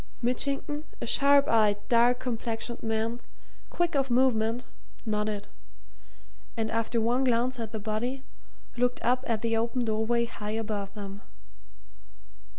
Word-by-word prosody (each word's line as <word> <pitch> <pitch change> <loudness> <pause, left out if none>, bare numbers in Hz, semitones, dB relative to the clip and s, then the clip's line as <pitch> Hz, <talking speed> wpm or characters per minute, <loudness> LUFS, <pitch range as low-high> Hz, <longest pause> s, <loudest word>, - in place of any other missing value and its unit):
Mitchington, 280 +4 0 0.2
a - - -4
sharp 280 0 +5
eyed, 215 -3 +4
dark 240 +1 +4
complexioned 235 -1 -3
man, 225 +2 -1 0.5
quick 345 -1 0
of 275 -2 +1
movement, 240 -2 +2 0.4
nodded, 210 -1 -1 1.1
and 220 -1 -1
after 230 +1 0
one 240 +4 +2
glance 250 0 +1
at 225 -2 -4
the 220 - -4
body, 230 +6 -2 0.5
looked 245 0 +1
up 250 +2 +2
at 230 -1 -1
the 230 -1 +1
open 235 +2 0
doorway 225 +2 +1
high 215 -1 -4
above 210 -3 -3
them. 200 -1 -7
230 Hz, 130 wpm, -28 LUFS, 220-250 Hz, 1.1 s, sharp